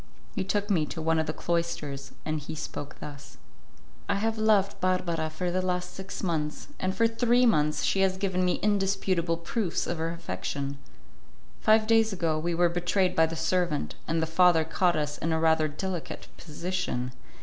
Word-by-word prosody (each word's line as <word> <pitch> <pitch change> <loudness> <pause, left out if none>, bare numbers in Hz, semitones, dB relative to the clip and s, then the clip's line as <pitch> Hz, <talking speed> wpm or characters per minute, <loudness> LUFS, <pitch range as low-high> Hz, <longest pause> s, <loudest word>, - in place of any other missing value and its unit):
He 195 - -1
took 205 +2 -1
me 160 -6 +2
to 165 - -6
one 160 0 +2
of 160 - 0
the - - 0
cloisters, 155 -5 -2
and 155 0 -1
he 145 +2 -7
spoke 145 -1 -6
thus: 145 0 -9 0.7
"I 200 - +3
have 220 +2 0
loved 210 -2 +3
Barbara 170 -3 0
for 175 +3 -2
the 185 +1 +1
last 180 -1 -2
six 190 +1 -7
months, 155 - -2
and 185 0 -1
for 230 - +3
three 240 +2 +3
months 150 -9 +2
she 195 - +1
has 190 -1 +2
given 190 -2 0
me 180 - +2
indisputable 195 -4 +1
proofs 175 +3 -2
of 170 - -3
her 165 +1 -1
affection. 140 - -4 0.8
Five 215 0 +4
days 225 0 +4
ago, 165 -5 0
we 170 +2 -1
were 175 +1 +4
betrayed 175 +2 +1
by 160 0 +5
the 165 - -5
servant, 160 - 0
and 165 0 +1
the - - +3
father 165 0 +4
caught 175 +2 +1
us 150 -1 -2
in 165 - -1
a 160 - +1
rather 160 -1 +3
delicate 175 +3 -5
position. 170 -6 -3
170 Hz, 185 wpm, -28 LUFS, 155-190 Hz, 0.8 s, by